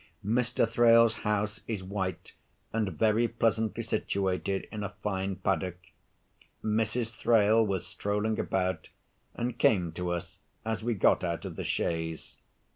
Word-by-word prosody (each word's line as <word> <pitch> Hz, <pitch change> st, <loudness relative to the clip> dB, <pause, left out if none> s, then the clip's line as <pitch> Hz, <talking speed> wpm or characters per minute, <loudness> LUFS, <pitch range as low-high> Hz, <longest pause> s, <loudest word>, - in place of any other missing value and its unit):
Mr. 120 Hz, +2 st, +2 dB
Thrale's 115 Hz, -1 st, +5 dB
house 105 Hz, +1 st, -1 dB
is 105 Hz, -5 st, -3 dB
white, 95 Hz, -1 st, -4 dB, 0.4 s
and 110 Hz, -4 st, 0 dB
very 110 Hz, +1 st, +3 dB
pleasantly 115 Hz, -1 st, 0 dB
situated 95 Hz, 0 st, -1 dB
in 105 Hz, -1 st, -4 dB
a 100 Hz, 0 st, -5 dB
fine 95 Hz, -1 st, -1 dB
paddock. 95 Hz, -1 st, -1 dB, 0.9 s
Mrs. 110 Hz, +2 st, 0 dB
Thrale 110 Hz, -1 st, +4 dB
was 100 Hz, -4 st, -1 dB
strolling 105 Hz, +2 st, -1 dB
about, 95 Hz, -3 st, -1 dB, 0.5 s
and 120 Hz, 0 st, -3 dB
came 90 Hz, -5 st, +3 dB
to 90 Hz, +2 st, -3 dB
us 85 Hz, -1 st, -4 dB, 0.3 s
as 110 Hz, -1 st, -2 dB
we 120 Hz, 0 st, 0 dB
got 95 Hz, -, +3 dB
out 85 Hz, -2 st, -2 dB
of -, -, -6 dB
the -, -, -4 dB
chaise. 80 Hz, -1 st, -2 dB
105 Hz, 135 wpm, -29 LUFS, 95-115 Hz, 0.9 s, Thrale's